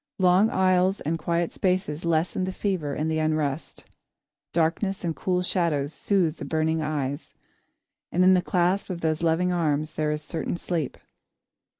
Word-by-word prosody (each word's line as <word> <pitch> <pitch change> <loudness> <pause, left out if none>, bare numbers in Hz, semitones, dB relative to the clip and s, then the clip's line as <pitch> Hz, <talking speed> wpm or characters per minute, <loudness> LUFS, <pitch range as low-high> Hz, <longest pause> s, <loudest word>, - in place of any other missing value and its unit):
Long 185 +3 +4
aisles 185 0 +2
and 165 +2 -2
quiet 170 +1 -1
spaces 180 -4 -1
lessen 170 +3 +1
the 185 - -3
fever 185 -7 -2
and 155 - -1
the 160 0 0
unrest. 155 -1 -2 0.7
Darkness 175 +4 0
and 165 -2 -1
cool 180 -1 0
shadows 160 -5 0
soothe 180 -6 +1
the - - -7
burning 160 0 0
eyes, 145 -1 -3 0.8
and 180 - +3
in 185 +1 +7
the 180 - +4
clasp 180 +3 +1
of 175 -2 -4
those 160 0 0
loving 170 +2 +2
arms 155 -3 0
there 155 -1 -1
is 150 0 -3
certain 165 +2 -3
sleep. 165 -6 -3
170 Hz, 160 wpm, -26 LUFS, 155-180 Hz, 0.8 s, in